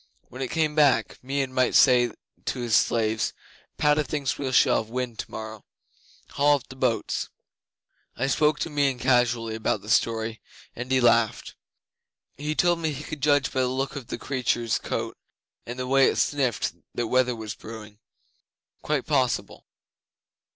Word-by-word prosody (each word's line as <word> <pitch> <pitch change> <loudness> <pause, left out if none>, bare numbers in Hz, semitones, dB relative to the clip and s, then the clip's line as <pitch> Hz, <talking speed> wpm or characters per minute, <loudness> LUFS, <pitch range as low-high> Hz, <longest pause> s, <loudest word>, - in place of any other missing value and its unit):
When 130 - -9
it 130 - -2
came 155 -2 0
back, 150 -3 +3
Meon 135 0 -2
might 130 -1 +2
say 125 -3 +5 0.3
to - - -2
his 120 -3 +1
slaves, 110 -1 +1 0.4
"Padda 150 0 +3
thinks 145 -2 -2
we 135 -2 -2
shall 125 - +4
have 110 - -3
wind 125 -2 -4
tomorrow. 110 -1 -7 0.7
Haul 145 +1 +4
up 140 - -6
the 130 - -10
boats!" 130 -3 -1 0.9
I 125 - 0
spoke 150 +2 +2
to 165 - -2
Meon 140 -3 +1
casually 120 -2 +1
about 110 0 -1
the 105 - -5
story, 115 -1 +1 0.3
and 125 +2 -6
he 130 - +4
laughed. 115 -3 +2 0.8
'He 150 +2 -3
told 175 0 +2
me 160 -2 -1
he 145 +1 -7
could 155 -2 -7
judge 145 -1 +2
by 130 - 0
the 130 - +2
look 135 +2 -2
of 135 -5 -7
the - - -4
creature's 120 -4 -1
coat - - -4 0.5
and 120 +1 -6
the 130 - -3
way 135 +1 +4
it - - -2
sniffed 135 -6 0 0.2
what 120 - -1
weather 125 +1 +2
was 110 -2 -6
brewing. 110 -2 -11 0.8
Quite - - -1
possible. - - -1
130 Hz, 165 wpm, -25 LUFS, 115-140 Hz, 0.9 s, say